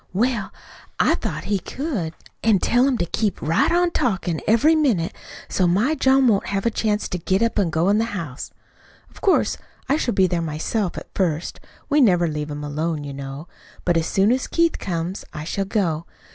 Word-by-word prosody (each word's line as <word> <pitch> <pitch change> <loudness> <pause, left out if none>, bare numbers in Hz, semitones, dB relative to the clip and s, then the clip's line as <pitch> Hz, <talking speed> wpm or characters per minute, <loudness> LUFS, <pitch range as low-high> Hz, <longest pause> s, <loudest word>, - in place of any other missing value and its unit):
"Well, 230 +1 0 0.5
I - - +4
thought - - -3
he 205 -1 0
could. 200 - -4 0.3
An' 220 -3 +5
tell 245 +7 +3
him 265 -3 +1
to 175 - 0
keep 205 +3 -1
right 160 - +2
on 350 0 +3
talkin' 190 - -1
every 250 +9 +5
minute 240 - +1 0.3
so 185 - +1
my 210 - +2
John 265 -2 +4
won't 205 -4 +2
have 195 +1 -2
a 235 - +3
chance 210 -1 0
to 180 - -3
get 190 +5 +1
up 230 -2 +1
an' 190 -4 +2
go 160 +2 +1
into 205 +2 +3
the 230 +1 -1
house. 145 -7 -6 0.6
Of - - -16
course, 385 - +2 0.3
I 280 +2 +2
shall 245 -6 -1
be 190 - +5
there 175 -2 0
myself, 165 +5 -2
at - - -9
first. 165 -4 -1 0.3
We 295 0 +3
never 180 -8 +4
leave 150 -1 -3
him 145 0 -5
alone, 150 +1 -2
you 140 -1 -6
know. 135 +3 -7 0.4
But 175 - +2
as 165 -1 +1
soon 200 +3 +3
as 255 +1 0
Keith 335 -1 +1
comes, 175 +1 -3
I 150 - -4
shall 195 +5 -2
go. 175 -6 -1
195 Hz, 200 wpm, -22 LUFS, 165-235 Hz, 0.6 s, An